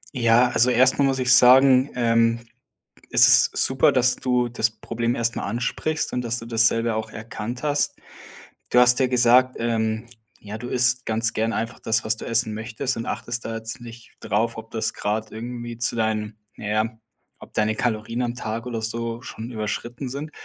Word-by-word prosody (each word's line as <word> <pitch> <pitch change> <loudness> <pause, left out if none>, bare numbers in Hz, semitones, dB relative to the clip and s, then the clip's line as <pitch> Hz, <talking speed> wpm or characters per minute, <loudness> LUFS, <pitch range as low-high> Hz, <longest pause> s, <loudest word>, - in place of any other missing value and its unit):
Ja, 120 0 +3
also 120 +1 +3
erst 130 +2 +4
mal 140 - +3
muss 135 -1 0
ich 125 -1 +4
sagen, 130 +2 +6
ähm 115 -1 +1 0.7
ist - - +7
es - - +6
super, 130 -1 +3
dass 125 -1 +3
du 125 -1 -1
das 115 -1 0
Problem 115 +2 -4
erst 115 -1 -1
mal - - -4
ansprichst 125 +8 -3
und, 125 - -2
dass 120 0 0
du 115 - -8
das 115 -1 +3
selber 115 -1 0
auch 110 0 -5
erkannt 110 +2 -7
hast 145 -1 -1 0.7
Du 125 - +3
hast 125 +1 +6
ja 130 - +2
gesagt, 125 +1 +4
ähm, 110 -1 -2 0.3
ja, 105 +1 -9
du 120 +2 -8
isst 125 +1 +3
ganz 110 0 +1
gern 110 +1 -2
einfach 115 +2 -5
das, 110 0 +1
was 110 0 +1
du - - -9
essen 115 -1 0
möchtest 115 +4 -4
und 115 - -5
achtest 120 0 -4
da 115 - -5
jetzt 110 +1 -4
nicht 120 -1 -13
drauf, 110 +3 -2
ob 110 0 -10
das 110 -1 -2
grad 110 +1 -4
irgendwie 120 +1 -7
zu 120 - +1
deinen 110 -1 -3 0.2
na - - -9
ja, 110 +2 -2 0.4
ob - - -14
deine 110 0 0
Kalorien 115 +1 -3
am 120 -1 -3
Tag 110 0 -5
oder 120 -2 -4
so 115 +1 -4
schon 115 -1 -9
überschritten 120 +3 -5
sind. 140 +4 -7
115 Hz, 195 wpm, -22 LUFS, 110-125 Hz, 0.7 s, ist